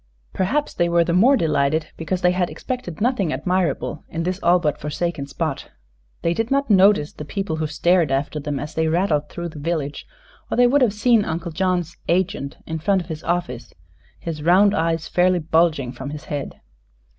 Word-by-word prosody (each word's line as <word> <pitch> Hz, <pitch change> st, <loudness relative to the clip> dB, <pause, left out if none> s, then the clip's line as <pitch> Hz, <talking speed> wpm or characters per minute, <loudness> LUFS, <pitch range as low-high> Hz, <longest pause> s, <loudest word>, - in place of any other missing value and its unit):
Perhaps 280 Hz, +11 st, 0 dB
they 175 Hz, -1 st, +1 dB
were 170 Hz, 0 st, +4 dB
the 170 Hz, -, -1 dB
more 245 Hz, +10 st, +5 dB
delighted 155 Hz, -, +1 dB
because 170 Hz, +3 st, -3 dB
they 180 Hz, -, +5 dB
had 180 Hz, -1 st, 0 dB
expected 250 Hz, -10 st, -5 dB
nothing 220 Hz, -8 st, +1 dB
admirable 165 Hz, +1 st, -1 dB
in 165 Hz, +1 st, -3 dB
this 185 Hz, +2 st, -2 dB
all 175 Hz, +1 st, +5 dB
but 155 Hz, -4 st, -1 dB
forsaken 150 Hz, 0 st, -3 dB
spot. 140 Hz, -, -4 dB, 0.5 s
They 170 Hz, -, +2 dB
did 225 Hz, +6 st, -2 dB
not 275 Hz, -3 st, +1 dB
notice 195 Hz, -5 st, +4 dB
the -, -, -8 dB
people 185 Hz, +2 st, -3 dB
who 155 Hz, -1 st, -1 dB
stared 165 Hz, 0 st, +2 dB
after 140 Hz, +3 st, -1 dB
them 145 Hz, -1 st, -3 dB
as 150 Hz, +3 st, -6 dB
they 160 Hz, 0 st, 0 dB
rattled 160 Hz, -3 st, +1 dB
through 170 Hz, 0 st, -5 dB
the 155 Hz, -, -10 dB
village, 150 Hz, -2 st, -3 dB, 0.4 s
or -, -, -2 dB
they 245 Hz, -, +6 dB
would 275 Hz, +4 st, +3 dB
have 245 Hz, -5 st, +4 dB
seen 225 Hz, 0 st, +3 dB
Uncle 165 Hz, 0 st, -4 dB
John's 175 Hz, 0 st, -1 dB
"agent" 180 Hz, -5 st, -1 dB
in 160 Hz, 0 st, -4 dB
front 190 Hz, +4 st, +2 dB
of 170 Hz, -, -18 dB
his 160 Hz, -1 st, -6 dB
office, 160 Hz, -8 st, -3 dB, 0.4 s
his 160 Hz, -3 st, -6 dB
round 190 Hz, +6 st, +5 dB
eyes 165 Hz, 0 st, 0 dB
fairly 180 Hz, +1 st, +3 dB
bulging 160 Hz, -5 st, +1 dB
from 130 Hz, +2 st, -7 dB
his 150 Hz, 0 st, -7 dB
head. 145 Hz, -2 st, -5 dB
170 Hz, 190 wpm, -22 LUFS, 155-185 Hz, 0.5 s, they